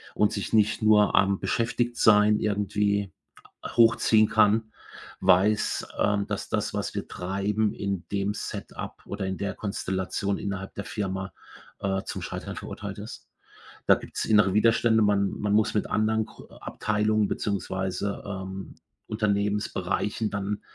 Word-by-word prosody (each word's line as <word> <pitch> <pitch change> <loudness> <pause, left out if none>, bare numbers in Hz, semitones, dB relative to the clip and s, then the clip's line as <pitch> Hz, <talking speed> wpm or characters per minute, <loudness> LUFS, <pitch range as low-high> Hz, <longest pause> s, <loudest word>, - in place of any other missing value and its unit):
und 105 - +3
sich 100 - -4
nicht 105 -1 +3
nur 105 -1 +5
am 100 0 +3
Beschäftigtsein 110 -3 +3
irgendwie 100 -1 0 0.6
hochziehen 115 -2 +4
kann, 110 0 +3 0.5
weiß, 100 +4 +3
ähm, 100 -1 +2
dass 105 -2 -4
das, - - -1
was - - -3
wir - - -3
treiben, 100 +3 -1
in 100 -3 -3
dem 100 0 0
Setup - - -7
oder 100 0 -4
in 95 -1 -3
der 100 -1 -3
Konstellation 100 0 -2
innerhalb 100 -1 -5
der 100 - -6
Firma, 95 -3 -3 0.5
äh, 95 0 -1
zum - - -5
Scheitern - - -5
verurteilt - - -7
ist. - - -9 0.6
Da - - +7
gibt's - - -5
innere 105 -3 +4
Widerstände, 110 +1 +4
man 100 -2 +3
man 105 -1 -2
muss 110 0 +3
mit 105 - 0
anderen 110 0 +1 0.3
Abteilungen 105 0 0
beziehungsweise, 100 0 -2
ähm, 95 -1 -6 0.3
Unternehmensbereichen 105 0 -1
dann 100 +1 -3
105 Hz, 130 wpm, -26 LUFS, 100-105 Hz, 0.6 s, Da